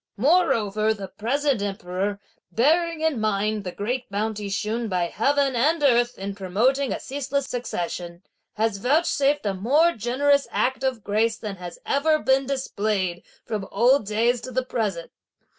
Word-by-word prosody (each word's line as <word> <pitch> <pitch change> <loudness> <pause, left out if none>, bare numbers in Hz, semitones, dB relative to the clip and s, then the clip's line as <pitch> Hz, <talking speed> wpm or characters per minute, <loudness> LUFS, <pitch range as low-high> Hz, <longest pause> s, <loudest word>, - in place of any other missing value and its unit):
Moreover, 220 - +2
the 195 -2 -7
present 270 +3 0
emperor, 195 0 -3 0.3
bearing 325 +6 +2
in 320 -6 +1
mind 215 0 0
the 180 - -4
great 240 +7 -3
bounty 210 0 -2
shewn 225 +3 -2
by 180 -2 0
heaven 275 +9 +1
and 295 +6 +2
earth 240 -2 +3
in 200 +1 -4
promoting 230 +9 +1
a - - -2
ceaseless 280 0 -3
succession, 175 -8 -4 0.3
has 220 -1 0
vouchsafed 285 - +2
a 200 - +1
more 280 - +3
generous 280 +4 +1
act 260 +1 0
of 255 -5 -1
grace 220 +2 +1
than 210 -4 -6
has 175 -1 -8
ever 310 +3 +2
been 265 -2 +2
displayed 205 -9 -1 0.2
from 210 -3 -4
old 240 +2 +3
days 230 +3 +1
to - - -7
the 255 +1 -1
present. 205 -9 -3
230 Hz, 150 wpm, -24 LUFS, 200-275 Hz, 0.3 s, earth